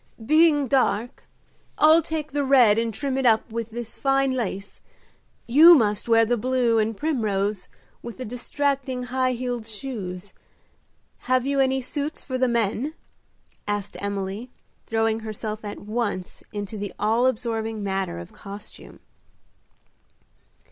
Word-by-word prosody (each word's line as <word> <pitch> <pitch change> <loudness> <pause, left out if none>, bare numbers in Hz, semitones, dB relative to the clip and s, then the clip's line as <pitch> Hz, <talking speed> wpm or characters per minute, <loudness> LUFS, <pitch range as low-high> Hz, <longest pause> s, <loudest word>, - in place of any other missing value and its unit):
"Being 310 0 +4
dark, 245 -3 0 0.5
I'll 315 +2 +6
take 315 -1 -4
the 290 0 0
red 250 -6 +5
and 230 0 0
trim 270 +4 -2
it 265 - -1
up 220 0 +2
with 230 0 -4
this 235 0 -6
fine 270 -1 +1
lace. 200 -6 -4 0.6
You 315 +8 +8
must 210 -4 +1
wear 225 0 +5
the 240 +2 +1
blue 245 -1 +1
and 215 0 -1
primrose, 210 -9 -1 0.3
with 235 -1 -8
the 255 - -5
distracting 260 +2 -2
high 255 +1 0
heeled 245 -2 -4
shoes. 205 -5 -6 0.9
Have 255 0 +1
you 280 0 0
any 265 0 +2
suits 290 +4 -4
for 255 -2 -4
the 255 - +3
men?" 235 +5 -1 0.7
asked 205 -1 -3
Emily, 200 +3 -4 0.4
throwing 225 0 +1
herself 215 0 -5
at 205 -1 -6
once 210 -4 -3
into 205 0 -5
the 205 -1 -5
all 225 +4 +2
absorbing 225 -3 -1
matter 195 - -2
of 85 0 -9
costume. 200 +1 -11
235 Hz, 135 wpm, -24 LUFS, 210-265 Hz, 0.9 s, You